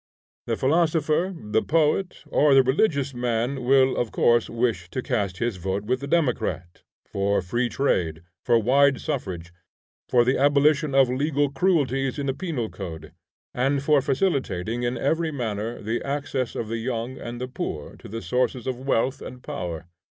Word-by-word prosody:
The 115 - 0
philosopher, 160 +3 +2
the 110 -4 0
poet, 165 +4 +1
or 145 -2 +3
the 135 - +7
religious 140 0 +1
man 120 +2 -1
will 130 +1 +4
of 120 -3 -1
course 120 -1 +3
wish 115 -7 -1
to 130 - -4
cast 100 -4 -1
his 120 -5 -1
vote 95 +2 -2
with 125 +3 0
the 140 - -6
democrat, 125 - -1 0.2
for 100 0 0
free 120 +7 -1
trade, 85 - 0 0.2
for 120 -1 +4
wide 135 +4 +3
suffrage, 90 - -4 0.6
for 120 -1 +4
the 130 - +2
abolition 145 +1 +3
of 135 -1 +6
legal 145 +1 0
cruelties 135 -5 +1
in 140 - -2
the 135 - 0
penal 150 -9 -3
code, 80 -5 -8 0.4
and 135 +2 0
for 145 -1 +4
facilitating 130 - -1
in 120 +1 -1
every 160 +3 0
manner 115 -5 -3
the 115 +3 -2
access 140 -3 -2
of 115 - -3
the 115 +1 -3
young 120 +1 -3
and 120 0 -6
the 125 - -3
poor 75 - -5
to - - -12
the 115 +2 -6
sources 125 +5 0
of 130 -2 -3
wealth 135 0 0
and 125 0 -9
power. 85 -2 -5
125 Hz, 165 wpm, -24 LUFS, 110-140 Hz, 0.6 s, the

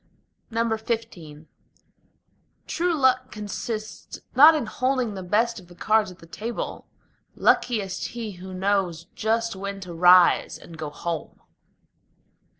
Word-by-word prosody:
XV 220 -9 -3 1.2
True 345 0 0
luck 255 -2 +2
consists 215 +1 -6 0.2
not 305 +5 +9
in 300 - -1
holding 255 0 -1
the 190 - -6
best 220 +5 +1
of 180 - -16
the 175 - -15
cards 215 +3 +2
at 180 - -13
the - - -15
table: 220 +8 -5 0.5
Luckiest 205 -6 +1
he 230 -3 -6
who 185 +1 -9
knows 185 -3 0
just 225 0 0
when 200 +1 -5
to 180 -2 -7
rise 180 +1 +5
and 170 - -13
go 155 -2 -5
home. 165 +1 -5
210 Hz, 125 wpm, -25 LUFS, 180-230 Hz, 1.2 s, not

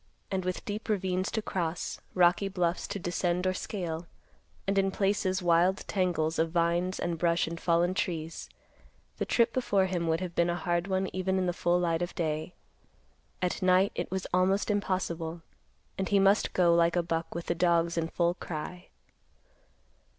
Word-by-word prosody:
And 190 -1 -1
with 185 0 -3
deep 210 +2 -5
ravines 190 -2 0
to 220 - -2
cross, 170 -4 -3
rocky 180 +2 +4
bluffs 180 -3 -1
to - - -4
descend 175 0 -1
or 185 - +2
scale, 175 -4 -4 0.6
and, 195 0 +2
in 195 0 +2
places, 195 -1 0
wild 175 +3 +3
tangles 170 -5 0
of 165 0 +2
vines 170 +2 +1
and 170 -2 -2
brush 170 0 +2
and 165 0 -6
fallen 170 +1 +2
trees, 165 -4 -3 0.7
the - - -2
trip 235 -1 +3
before 205 -7 +2
him 175 -3 -1
would 160 0 +1
have 180 -2 -4
been 170 0 +2
a 175 - 0
hard 175 +1 -1
one 190 0 0
even 190 0 0
in 185 - +1
the 175 - 0
full 175 0 +1
light 170 -1 0
of 175 - -3
day. 155 0 -2 0.9
At 180 +3 -1
night, 185 +1 +4
it - - -3
was 190 0 -3
almost 190 +3 +2
impossible, 175 -5 -2 0.6
and 190 - -1
he 205 - +4
must 195 +2 +3
go 175 -2 +4
like 170 0 +3
a 175 - +2
buck 165 -1 -3
with 170 - -4
the - - 0
dogs 170 0 +2
in 165 -1 0
full 170 +1 +1
cry. 175 +1 -6
180 Hz, 180 wpm, -29 LUFS, 170-190 Hz, 0.9 s, rocky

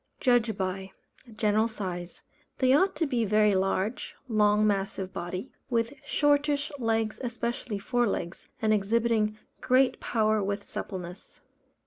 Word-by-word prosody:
Judged 240 -5 +2
by: 190 0 -3 0.4
General 215 0 +2
size. 185 -5 -6 0.3
They 255 0 +4
ought 380 +7 +3
to 330 - 0
be 250 -5 0
very 210 0 +3
large, 195 +4 -1
long 210 -2 +3
massive 195 -2 -1
body, 180 +8 -5 0.2
with 230 0 0
shortish 290 0 +2
legs 225 -2 0
(especially 235 -2 -3
fore 240 +4 +1
legs) 170 -3 -4 0.2
and 215 0 +4
exhibiting 215 +1 +1 0.2
great 255 +1 +3
power 215 -2 +1
with 200 +1 -3
suppleness. 180 -2 -7
215 Hz, 125 wpm, -28 LUFS, 195-240 Hz, 0.4 s, They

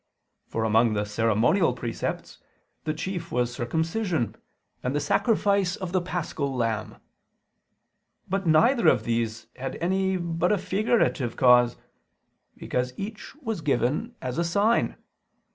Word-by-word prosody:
For 110 - -2
among 110 +1 +3
the 105 0 0
ceremonial 115 - +2
precepts, 120 -2 -4 0.5
the 155 - 0
chief 170 +1 -4
was 120 0 0
circumcision 160 - -1 0.5
and 130 +3 -2
the - - +2
sacrifice 200 - +2
of 185 -4 -5
the 185 -1 +1
paschal 155 -6 -3
lamb. 115 -3 -1 1.3
But 195 -1 -1
neither 195 - +4
of - - +4
these 115 -1 -2
had 135 0 -4
any 190 +2 0
but 170 +1 0
a 210 - +3
figurative 190 - +1
cause: 125 -1 +5 0.8
because 125 0 -2
each 210 +6 -7
was 225 - -4
given 150 - 0
as 125 +3 -3
a - - +2
sign. 205 +7 +2
160 Hz, 125 wpm, -26 LUFS, 120-190 Hz, 1.3 s, cause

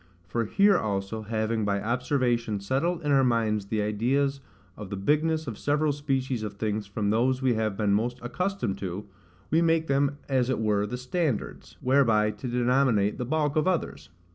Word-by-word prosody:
For 115 +6 -2
here 195 - +4
also, 100 +1 -3
having, 110 +1 -1
by 100 -1 0
observation, 120 -2 0
settled 155 - -1
in 145 - 0
our 135 -1 +5
minds 110 -4 +1
the 105 0 -1
ideas 135 +7 0 0.4
of 105 -3 -8
the 100 - -4
bigness 155 +9 +1
of 115 -6 -6
several 150 +1 +1
species 135 -4 -2
of 105 -2 -4
things 105 0 -2
from 100 0 -1
those 130 +4 +1
we 130 -2 +3
have 110 -3 -1
been 105 -2 +2
most 120 +4 0
accustomed 120 - -2
to, 95 +1 -5 0.5
we 160 +2 +4
make 165 -1 +2
them 140 0 +1
as 130 -2 +1
it 130 - +1
were 105 -2 +1
the 125 - -4
standards, 130 - -3
whereby 115 -5 +3
to 105 +4 -7
denominate 120 -4 +2
the 125 - -2
bulk 150 +2 0
of 155 +3 +2
others. 180 - -2
120 Hz, 180 wpm, -27 LUFS, 105-140 Hz, 0.5 s, our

